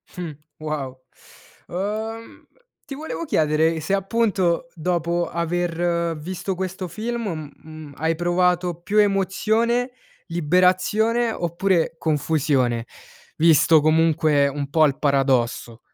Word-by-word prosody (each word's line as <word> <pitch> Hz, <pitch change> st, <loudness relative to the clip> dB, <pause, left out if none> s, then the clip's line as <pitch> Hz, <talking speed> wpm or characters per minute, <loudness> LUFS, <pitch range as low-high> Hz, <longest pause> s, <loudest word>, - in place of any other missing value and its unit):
Mh, 175 Hz, -3 st, -5 dB, 0.3 s
wow. 145 Hz, -4 st, -5 dB, 0.7 s
Uhm, 220 Hz, +5 st, -5 dB, 0.4 s
ti 275 Hz, -, -7 dB
volevo 320 Hz, +3 st, -5 dB
chiedere 160 Hz, -, +1 dB
se, 160 Hz, +6 st, -2 dB
appunto, 195 Hz, 0 st, 0 dB
dopo 170 Hz, 0 st, -1 dB
aver 170 Hz, 0 st, -1 dB
visto 185 Hz, +4 st, -4 dB
questo 185 Hz, 0 st, -4 dB
film, 215 Hz, -8 st, -4 dB
mhmm, 155 Hz, -2 st, -12 dB
hai 160 Hz, +2 st, 0 dB
provato 175 Hz, 0 st, 0 dB
più 205 Hz, +4 st, -2 dB
emozione, 220 Hz, +5 st, +1 dB, 0.4 s
liberazione 185 Hz, +8 st, +2 dB
oppure 175 Hz, -2 st, 0 dB
confusione, 140 Hz, -6 st, 0 dB, 0.5 s
visto 160 Hz, 0 st, +5 dB
comunque 155 Hz, -2 st, +3 dB
un 140 Hz, 0 st, -4 dB
po' 155 Hz, +1 st, +4 dB
il 140 Hz, -1 st, 0 dB
paradosso. 130 Hz, -5 st, 0 dB
170 Hz, 100 wpm, -22 LUFS, 155-195 Hz, 0.7 s, visto